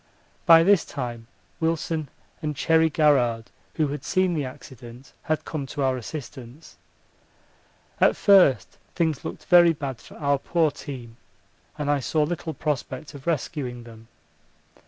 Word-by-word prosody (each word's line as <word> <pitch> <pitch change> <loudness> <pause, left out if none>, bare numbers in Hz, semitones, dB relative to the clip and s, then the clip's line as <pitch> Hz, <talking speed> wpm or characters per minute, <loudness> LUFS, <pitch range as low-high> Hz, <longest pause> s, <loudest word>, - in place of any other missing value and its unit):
By 165 -1 +8
this 195 -1 +4
time 120 -4 -6 0.3
Wilson 160 -2 -1 0.3
and 150 -2 -3
Cherry 160 +3 +3
Garrard, 125 -7 +2 0.2
who 155 -3 +1
had 145 -1 -5
seen 185 -1 +1
the 155 -3 -1
accident, 125 0 -12
had 155 -2 -2
come 145 -4 -4
to 140 - -3
our 130 -1 +1
assistance. 130 +1 -9 1.2
At - - +4
first 135 - +4 0.2
things 160 -5 0
looked - - -7
very 175 -2 +6
bad 140 -5 -6
for - - -15
our 140 -1 +1
poor 165 0 +1
team, 125 -5 -9 0.6
and 150 -2 -3
I 145 - +2
saw 150 +5 0
little 160 0 -4
prospect 145 0 -4
of 140 +1 -12
rescuing 130 -6 -3
them. 115 -1 -14
145 Hz, 140 wpm, -24 LUFS, 125-160 Hz, 1.2 s, By